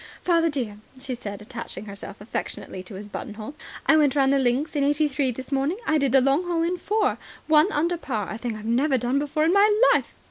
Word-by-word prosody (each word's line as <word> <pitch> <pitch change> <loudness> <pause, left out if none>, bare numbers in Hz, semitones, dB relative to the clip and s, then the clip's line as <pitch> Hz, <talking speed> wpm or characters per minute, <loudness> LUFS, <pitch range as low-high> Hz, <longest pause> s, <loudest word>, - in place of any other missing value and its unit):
"Father 335 -2 +3
dear," 245 -8 -3 0.2
she 260 0 -5
said, 205 -4 -7
attaching 210 - -7
herself 200 0 -9
affectionately 205 -2 -5
to 185 +2 -11
his 205 +2 -7
buttonhole, 215 +4 -7 0.3
"I - - +5
went 295 -3 +3
round 275 -1 +4
the 275 - +3
links 265 +5 0
in 285 - +2
eighty 295 +2 +2
three 270 -1 0
this 255 +3 -6
morning. 275 +7 0
I 310 0 +2
did 275 -3 +1
the 270 0 +5
long 275 +7 +2
hole 335 -1 +1
in 350 +2 0
four. 420 +4 0 0.3
One 310 +5 +4
under 340 +2 0
par, 220 - -3
a 215 - -5
thing 235 -2 -3
I've 215 - -9
never 260 +5 +2
done 245 +3 0
before 300 +2 0
in 335 - +3
my 405 +2 +5 0.2
life." - - -1
275 Hz, 225 wpm, -25 LUFS, 235-310 Hz, 0.3 s, I